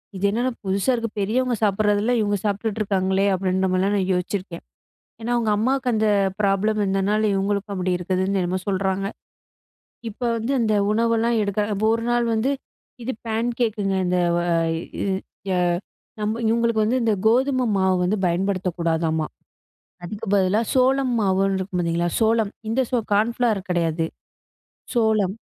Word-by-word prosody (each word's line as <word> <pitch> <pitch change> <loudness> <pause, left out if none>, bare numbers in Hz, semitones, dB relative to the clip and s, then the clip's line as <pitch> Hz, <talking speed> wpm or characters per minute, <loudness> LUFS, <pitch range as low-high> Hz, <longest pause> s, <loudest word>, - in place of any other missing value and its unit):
இது 190 +1 -2
என்னடா 245 +4 0
புதுசா 195 +6 +1
இருக்கு 230 -1 -3
பெரியவங்க 240 +5 +1
சாப்பிடுறதெல்லாம் 210 +3 +2
இவங்க 205 -1 +1
சாப்பிட்டுட்டு 210 +1 -1
இருக்காங்களே 195 -1 +1
அப்படின்ற 190 0 0
மாதிரிலாம் 190 +2 +1
நான் 190 -1 -1
யோசிச்சிருக்கேன். 180 -1 -3 0.6
ஏன்னா 235 - -3
அவங்க 230 -2 +1
அம்மாவுக்கு 255 +3 +1
அந்த 220 0 +2 0.3
ப்ராப்ளம் 205 +2 +1
இருந்ததுனால 195 +2 +1
இவங்களுக்கும் 200 +1 -1
அப்படி 185 -1 -1
இருக்குதுன்னு 185 +2 0
என்னமோ 180 +1 -1
சொல்றாங்க. 195 0 0 1.0
இப்ப 220 - -14 0.2
வந்து 230 +4 -2
அந்த 220 -2 +2 0.2
உணவெல்லாம் 230 +1 +2
எடுக்க, 200 0 -2 0.2
இப்ப 215 +2 -1
ஒரு 230 - -4
நாள் 240 0 +2
வந்து 225 +5 +1 0.5
இது 255 - -2 0.2
பேன்கேக்குங்க, 225 -3 -1
இந்த 180 0 +1 2.0
நம்ம 215 +2 -1
இவங்களுக்கு 230 -1 +2
வந்து 240 +4 +1
இந்த 225 -2 +2
கோதுமை 255 +2 +2
மாவு 190 -1 +2
வந்து 190 +4 +1
பயன்படுத்தக் 185 0 -1
கூடாதாம்மா. 160 -2 0 0.8
அதுக்கு 210 +5 -6
பதிலா 195 +2 +2
சோளம் 260 0 +3
மாவுன்னு 195 0 +2
இருக்கு 190 -1 -4
பாத்தீங்களா 170 0 0
சோளம் 220 -2 +2 0.2
இந்த 250 +4 +1 0.3
கான்ஃப்ளார் 225 0 +1
கிடையாது 165 -2 0 0.9
சோளம். 215 -5 +2
205 Hz, 130 wpm, -23 LUFS, 190-230 Hz, 2.0 s, சோளம்